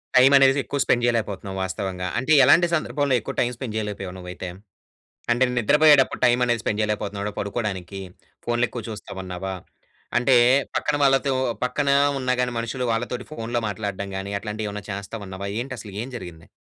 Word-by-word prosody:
Time 130 +2 +7
అనేది 135 +1 +5
ఎక్కువ 140 - -3
spend 120 - +2
చెయ్యలేకపోతన్నావు 105 -5 -1
వాస్తవంగా. 95 -1 -3
అంటే 130 +5 -2
ఎలాంటి 165 +7 +6
సందర్భంలో 145 -2 0
ఎక్కువ 110 - -6
టైమ్ 125 0 +1
స్పెండ్ 115 -2 -6
చెయ్యలేపోయావు 100 -4 -4
నువ్వైతే? 90 0 -7 0.8
అంటే 120 +2 +3
నిద్రపొయ్యేటప్పుడు 145 +3 +5
టైమ్ 120 0 +3
అనేది 120 -2 +1
స్పెండ్ 105 - -1
చెయ్యలేకపోతున్నావా 105 -1 -2
పడుకోడానికి? 100 -3 -3 0.5
ఫోన్‌లు 120 0 +1
ఎక్కువ 120 - -6
చూస్తావన్నావా? 95 -3 -6 0.6
అంటే 125 +2 +3 0.4
పక్కన 150 - 0
వాళ్ళతో 135 0 +3 0.3
పక్కన 140 +3 0 0.3
ఉన్నా 130 -1 0
గానీ 125 -1 0
మనుషులు 115 +2 -3
వాళ్ళతోటి 120 +2 -3
ఫోన్‌లో 120 -3 -2
మాట్లాడడం 100 -1 -4
గానీ 95 +1 -5
అట్లాంటివి 105 +1 -4
ఏవన్నా 105 0 -6
చేస్తావన్నావా? 100 -1 -6
ఏంటి 130 +1 -5
అసలు 105 -2 -9
ఏం 130 - -7
జరిగింది? 85 -6 -10
115 Hz, 150 wpm, -23 LUFS, 100-125 Hz, 0.8 s, టైమ్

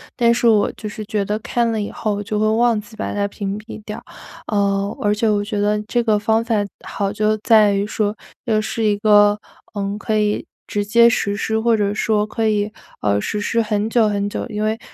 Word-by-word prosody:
但 235 -1 +4
是 235 0 +1
我 215 -3 +4
就 215 - -6
是 215 +1 -6
觉 210 -2 -1
得， 210 +2 -1
看 235 +2 0
了 220 -2 -1
以 205 - -4
后 215 -2 -2
我 205 - -4
就 210 +1 -2
会 215 - +2
忘 230 +1 +3
记， 210 +1 -12
把 215 - -4
它 205 0 0
屏 200 0 -4
蔽 215 0 -10
掉。 210 - -7 0.5
呃， 200 -1 0
而 205 0 +2
且 220 +1 +1
我 205 -1 +1
觉 205 0 -3
得 210 +1 +1
这 240 +3 0
个 220 -3 +2
方 220 +2 +1
法 230 -1 0 0.3
好 200 -1 -2
就 215 +1 +1
在 215 -2 +5
于 200 0 0
说， 210 0 -1 0.3
又 220 -3 +2
是 220 +1 -2
一 205 -1 +2
个， 205 0 +5 0.4
嗯， 200 -1 -3
可 215 +1 -1
以 210 0 0 0.2
直 205 0 -2
接 235 +3 +6
实 200 -3 0
施 220 +2 -1
或 230 0 +3
者 205 -1 0
说 210 0 +1
可 220 +1 -1
以， 210 -1 0 0.3
呃， 100 -1 +2
实 210 - -3
施 230 +3 +1
很 215 -1 -1
久 225 -1 +3
很 205 -1 -1
久。 - - -4
因 210 -2 -3
为 220 +1 0
210 Hz, 245 characters per minute, -20 LUFS, 205-220 Hz, 0.5 s, 接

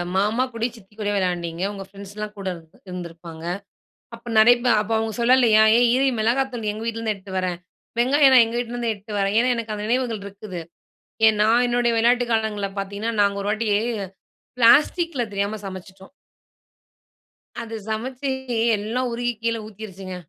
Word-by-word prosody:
மாமா 210 +6 +2
கூட, 230 -1 -5
சித்தி 210 -2 -18
கூட 205 -1 -1
விளையாண்டீங்க. 175 -3 -2
உங்க 195 -1 -7
ஃப்ரெண்ட்ஸ்லாம் 205 +1 -8
கூட 195 -1 -6
இ 160 -1 -23
இருந்திருப்பாங்க. 170 -2 -8 0.7
அப்ப 230 +1 -14
நெறையப்ப 240 +3 +5
அப்ப 210 +1 -5
அவுங்க 220 -1 -2
சொல்லலயா, 235 -3 +5 0.2
ஏய் 245 0 +4
இரு! 270 +2 +3
மிளகாத்தூள் 240 0 0
எங்க 215 +1 -7
வீட்லருந்து 225 -1 -2
எடுத்துட்டு 190 -1 -8
வரேன். 180 -2 -2 0.4
வெங்காயம் 270 +2 +5
நான் 245 -2 +8
எங்க 230 +1 -4
வீட்லேருந்து 240 -1 -2
எடுத்துட்டு 210 0 -7
வரேன். 195 +1 0
ஏன்னா, 250 +2 +3
எனக்கு 225 -2 -4
அந்த 210 0 -5
நினைவுகள் 235 -3 0
இருக்குது. 200 -2 -8 0.7
ஏன் 220 -1 +3
நான் 230 +3 +4
என்னுடைய 240 -1 +1
விளையாட்டு 240 +2 +3
காலங்கள்ல 215 -3 -1
பார்த்தீங்கன்னா, 200 +4 -3
நாங்க 200 0 +2
ஒரு 205 - -1
வாட்டி 215 +1 -1 0.9
பிளாஸ்டிக்ல 290 +4 +4
தெரியாம 200 +2 -2
சமச்சிட்டோம். 190 +2 -10 1.5
அது 225 -1 -7
சமைச்சு 255 +5 -3 0.5
எல்லாம் 235 +5 -2
உருகி 240 +1 -1
கீழே 230 0 0
ஊத்திருச்சுங்க. 195 -3 -8
220 Hz, 150 wpm, -23 LUFS, 200-240 Hz, 1.5 s, நான்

